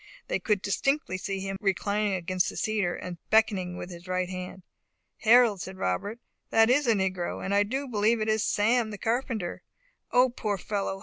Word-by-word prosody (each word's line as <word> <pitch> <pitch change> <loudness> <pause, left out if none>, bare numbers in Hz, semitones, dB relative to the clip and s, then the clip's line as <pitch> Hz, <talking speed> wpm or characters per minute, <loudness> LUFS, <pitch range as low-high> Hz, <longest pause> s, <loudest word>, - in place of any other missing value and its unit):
They - - 0
could 210 -3 0
distinctly 240 -2 0
see 195 0 -3
him 195 0 -4
reclining 205 +1 0
against 185 +1 0
the - - -8
cedar, 210 -5 0
and 175 -2 -7
beckoning 200 -5 +2
with 180 - -7
his 175 +1 -11
right 185 0 -1
hand. 185 0 -7 0.5
"Harold," 225 -4 +5
said 190 +1 -7
Robert, 185 - -2 0.3
"that 225 +1 +5
is 280 +1 +3
a 230 - +5
negro, 185 -3 -2
and 195 - -1
I 200 - +5
do 265 +7 -2
believe 220 0 +2
it 215 - -1
is 220 0 +2
Sam, 225 +2 +2
the 210 - -6
carpenter. 225 -4 -2 0.5
O 250 +1 +5
poor 210 -4 -2
fellow! 195 0 -3
205 Hz, 185 wpm, -28 LUFS, 185-225 Hz, 0.5 s, Harold